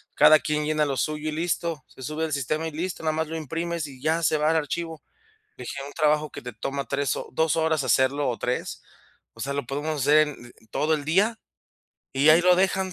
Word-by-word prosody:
cada 155 +1 +7
quien 150 -1 -1
llena 155 -1 +1
lo 135 -2 -2
suyo 155 0 -1
y - - -3
listo. 165 -2 -2
Se - - -16
sube 155 +3 -2
al 155 - -4
sistema 155 +4 -1
y - - -5
listo, 170 +2 -4
nada 155 -1 +1
más 160 0 -1
lo 165 +1 -4
imprimes 165 +1 -3
y 130 -2 -13
ya 160 +2 +1
se 155 0 +3
va 155 +1 +2
al - - +1
archivo". 160 +1 -3 0.6
Dije: 140 - -6
"Un 145 - -9
trabajo 150 -1 +2
que - - -8
te 125 -1 -7
toma 135 +5 -3
3 140 -3 0
o - - -6
2 160 +2 +1
horas 160 -3 +1
hacerlo 130 +2 +2
o 115 - -4
3 125 +1 -3 0.5
O 115 - -14
sea, 140 +3 -2
lo 140 -4 -3
podemos 145 +2 -3
hacer 150 +2 +5
en - - -4 0.2
en 120 - -15
en 110 - -24
todo 155 +3 +1
el 145 -2 -3
día 205 +8 +2 0.7
y 140 +3 +5
ahí 165 +2 +7
lo 180 0 +5
dejan 190 0 +1
155 Hz, 235 wpm, -25 LUFS, 140-160 Hz, 0.7 s, cada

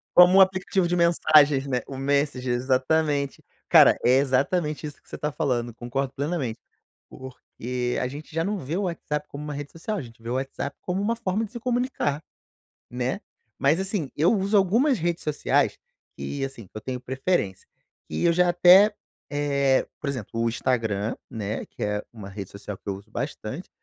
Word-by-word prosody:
Como 180 +2 +8
um - - +9
aplicativo 185 -1 +2
de 175 - 0
mensagens, 155 -5 +4
né, 125 -3 0
o 135 - -8
Menssager, 135 -2 0
exatamente. 140 +3 0 0.2
Cara, - - +7
é 125 - +6
exatamente 150 +3 0
isso 145 - -11
que - - -26
você - - -6
tá 150 - -2
falando, 120 -5 -1
concordo 135 +3 -3
plenamente. 140 -6 -2 0.5
Porque 125 -1 -5
a 125 - 0
gente 150 +3 -10
já 165 - +1
não 205 +2 -1
vê 150 +4 -4
o 200 - 0
WhatsApp 150 -4 -3
como 145 +1 -7
uma 150 -1 -5
rede 145 0 -6
social, 205 +6 -4
a - - -3
gente 115 -1 -13
vê 115 - -9
o 125 - -1
WhatsApp 135 +1 -4
como 185 +2 -2
uma 225 +3 +1
forma 220 -1 -1
de 215 - -10
se 240 - -7
comunicar, 245 - -1 0.7
né. 125 +9 -2 0.4
Mas, 145 +6 +3
assim, 190 -7 -2
eu 160 +8 +4
uso 200 0 +1
algumas 230 +9 +3
redes 170 0 -2
sociais 150 -1 +1 0.4
que, 140 -1 -4
assim, 120 -8 -8
eu 110 - -7
tenho 125 +2 -5
preferência, 130 - -1 0.4
que - - -3
eu 170 - +5
já 180 +1 +3
até, 190 +4 +7 0.4
eh, 140 -2 +2
por 145 - -3
exemplo, 130 -7 -4
o 115 - +2
Instagram, 115 -3 -1
né, 110 -3 -4
que - - -11
é 105 0 0
uma 105 -4 -9
rede 100 -1 -7
social 100 0 -8
que - - -12
eu 100 - -1
uso 105 +3 -15
bastante, 140 +4 -5
140 Hz, 185 wpm, -25 LUFS, 125-175 Hz, 0.7 s, um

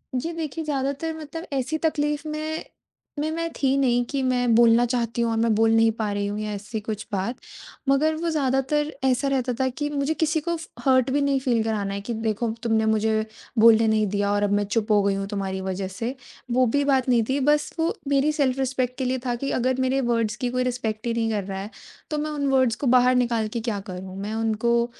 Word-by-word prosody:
जी, 270 +7 -2
देखिए, 325 -1 -4
ज़्यादातर 280 +2 -2
मतलब 320 +2 -7
ऐसी 275 +4 -1
तकलीफ़ 295 -1 -1
में 310 +1 -3 0.6
में 305 +1 0
मैं 330 +1 -2
थी 270 -1 +1
नहीं 245 -3 +2
कि 280 -1 -1
मैं 245 -2 +2
बोलना 235 +1 +6
चाहती 235 -1 -1
हूँ 230 -1 +1
और 225 - 0
मैं 225 0 +2
बोल 225 +1 +3
नहीं 225 0 +5
पा 220 -2 -3
रही 200 0 -1
हूँ 205 +1 -3
या 215 0 -3
ऐसी 210 +2 -5
कुछ 215 0 -5
बात। 200 +5 -1 0.5
मगर 305 +3 +3
वो 335 +2 -2
ज़्यादातर 295 0 0
ऐसा 265 +1 +2
रहता 260 -2 0
था 265 - +2
कि 295 +3 -3
मुझे 290 +1 0
किसी 315 0 +1
को 340 +2 -1
फ 320 - -8 0.2
हर्ट 260 -1 +4
भी 285 +2 +2
नहीं 280 -1 +2
फ़ील 240 -4 +1
कराना 210 -3 -2
है 200 - -4
कि, 235 +4 -4
"देखो, 225 +1 -1
तुमने 220 -1 +2
मुझे 220 0 +1 0.3
बोलने 225 0 +6
नहीं 215 -1 +2
दिया 205 +1 0
और 205 0 +1
अब 205 - +1
मैं - - +1
चुप 215 +1 -1
हो 205 -1 +5
गई 200 0 +1
हूँ 195 0 -3
तुम्हारी 195 -2 -3
वजह 190 0 -3
से।" 245 +2 -3 0.4
वो 255 +1 +4
भी 285 +5 +1
बात 265 -2 +2
नहीं 235 -2 +4
थी, 270 +2 +1
बस 295 +2 +2
वो 325 +1 +1
मेरी 280 +2 +3
सेल्फ़-रिस्पेक्ट 265 -3 0
के 265 - -2
लिए 255 +1 0
था 245 -1 0
कि, 275 +3 -3
"अगर 255 +1 0
मेरे 260 +1 +1
वर्ड्स 225 -2 0
की 250 +1 -2
कोई 255 0 0
रिस्पेक्ट 240 -2 -3
ही 235 - 0
नहीं 230 -1 0
कर 210 -2 -1
रहा 190 0 -5
है, 200 - -6 0.4
तो 305 - 0
मैं 305 +1 -2
उन 285 -2 -1
वर्ड्स 260 -3 +3
को 275 - -3
बाहर 250 +1 +4
निकाल 235 -3 +1
के 235 +2 -4
क्या 205 -3 -2
करूँ? 185 +1 -7
मैं 210 +2 -4
उनको 225 +1 +1
245 Hz, 235 wpm, -24 LUFS, 220-280 Hz, 0.6 s, बोलना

